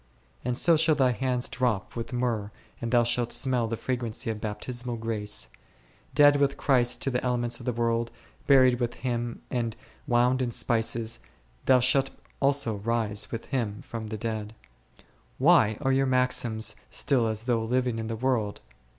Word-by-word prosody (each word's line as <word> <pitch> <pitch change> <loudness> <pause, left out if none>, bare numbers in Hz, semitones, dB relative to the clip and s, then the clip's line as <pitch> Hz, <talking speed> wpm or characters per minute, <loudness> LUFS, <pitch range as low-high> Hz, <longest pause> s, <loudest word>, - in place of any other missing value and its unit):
And 125 0 0
so 165 +2 +5
shall 160 0 +3
thy 130 -3 +3
hands 125 +1 -1
drop 120 -7 -1
with 115 -1 -5
myrrh 120 -4 -1 0.3
and 115 - -2
thou 120 -1 +5
shalt 120 0 0
smell 125 -3 0
the 115 0 -3
fragrancy 120 -3 -2
of 105 -1 -6
Baptismal 120 +3 -4
grace; 110 -2 -3 0.7
dead 145 -1 +6
with 140 -1 +1
Christ 125 -4 +2
to 135 - 0
the 125 - -1
elements 120 -1 0
of - - -10
the - - +2
world, 115 0 0 0.4
buried 130 -3 +5
with 120 -1 -2
Him 120 -1 -3
and 115 -3 -2 0.3
wound 125 +2 +3
in 125 - 0
spices, 115 0 0 0.5
thou 130 -1 +5
shalt 130 +2 +3 0.3
also 140 -6 +2
rise 110 -1 -1
with 115 - -5
Him 110 -6 -3
from 115 -2 -6
the 110 0 -5
dead. 110 -1 -4 0.8
Why 130 -8 +4
are 135 -2 +1
your 135 0 +2
maxims 120 -4 +1
still 130 -5 +1
as 110 0 -1
though 120 -2 0
living 125 0 0
in 110 - -4
the 115 - -3
world 115 -4 -1
120 Hz, 170 wpm, -27 LUFS, 115-130 Hz, 0.8 s, dead